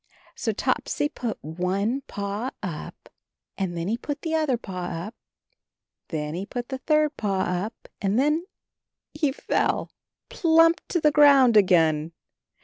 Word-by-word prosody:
So - - -2
Topsy 290 - -1
put 240 -6 -4
one 185 - -1
paw 205 +5 -3
up, 170 -6 -7 0.5
and 185 -3 -3
then 170 +1 -3
he 225 +3 0
put 290 -1 -5
the 320 -1 -2
other 305 -6 +1
paw 185 -5 -6
up, 175 +8 -5 0.9
and 160 - -2
then 150 0 -4
he 185 +4 -4
put 245 -1 -5
the 265 -1 -4
third 305 0 +2
paw 195 -3 0
up, 185 +5 -3
and 200 +1 +1
then 300 +6 +1 0.3
— - - -64 0.3
he 300 -2 +1
fell 265 - -1 0.4
plump 330 0 +4
to 345 - 0
the 300 -1 +4
ground 280 -5 +6
again. 165 -5 +4
225 Hz, 150 wpm, -25 LUFS, 180-290 Hz, 0.9 s, ground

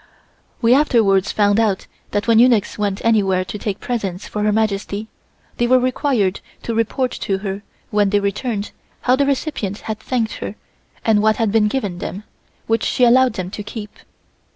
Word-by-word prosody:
We 230 +1 +6
afterwards 225 -9 +3
found 205 0 +3
out 210 -4 +1 0.2
that 205 +2 -2
when 225 -1 +5
eunuchs 235 -4 +4
went 205 -1 -2
anywhere 195 -5 +2
to 210 - -6
take 205 -2 -3
presents 200 -6 -3
for 210 - -4
Her 210 0 +2
Majesty, 210 0 -1 0.5
they 240 - +1
were 255 +1 +5
required 250 -6 +1 0.2
to 230 - -3
report 230 +3 0
to 195 - 0
her 195 +1 -3 0.3
when 205 -1 +3
they 205 +1 +3
returned 205 +1 -2 0.3
how 255 - +3
the 280 +1 +1
recipient 260 - -2
had 215 -1 -5
thanked 225 -1 -2
her 205 - -6 0.5
and 215 -2 +4
what 215 0 +3
had 225 -2 0
been 215 -1 +3
given 205 -7 -2
them, 195 +3 -5 0.4
which 225 0 +1
she 250 - +1
allowed 250 +1 +5
them 185 -3 -5
to 210 - -5
keep. 210 0 -7
215 Hz, 175 wpm, -19 LUFS, 200-240 Hz, 0.5 s, We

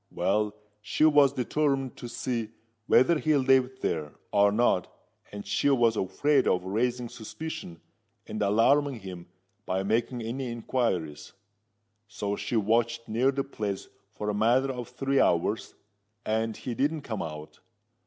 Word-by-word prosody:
Well, 105 +1 0 0.3
she 150 - +1
was 145 -3 +6
determined 135 0 0
to 120 - -7
see 115 -3 -3 0.4
whether 155 +6 +5
he 155 0 +2
lived 130 -1 +2
there, 75 -3 -2 0.2
or 100 0 +4
not—and 105 -1 -2
she 100 +7 +1
was 120 -5 +3
afraid 130 +9 +1
of 90 - +2
raising 120 +5 -1
suspicion 115 - -7 0.5
and 110 - -5
alarming 120 +5 +3
him 90 -3 -8 0.4
by 95 +1 0
making 115 +4 0
any 125 +2 -4
inquiries: 110 - -2 0.7
so 100 0 -3
she 120 - -4
watched 115 +2 +1
near 120 +5 +2
the 135 0 -1
place 105 -7 -5 0.2
for 105 0 -6
a - - -4
matter 120 +6 +2
of 125 -3 -6
three 135 0 0
hours, 90 +5 +1 0.5
and 110 0 -1
he 125 - -5
didn't 145 +5 0
come 110 -7 -4
out. 75 -1 -7
115 Hz, 140 wpm, -28 LUFS, 100-130 Hz, 0.7 s, was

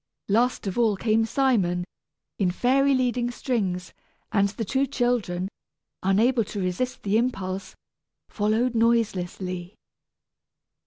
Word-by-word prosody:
Last 235 +5 +2
of 195 +4 -2
all 220 -4 +3
came 225 +1 +2
Simon, 220 -9 +1 0.6
in 190 -3 +3
fairy 270 +8 +3
leading 245 -1 +1
strings, 195 -8 -2 0.4
and 200 -1 +3
the 215 +3 -4
two 265 +6 +1
children, 240 -9 0 0.5
unable 225 +6 +3
to 205 - -6
resist 185 +7 -2
the 210 +2 +2
impulse, 195 -6 -3 0.5
followed 220 +4 +1
noiselessly. 190 -5 0
220 Hz, 110 wpm, -25 LUFS, 190-245 Hz, 0.6 s, all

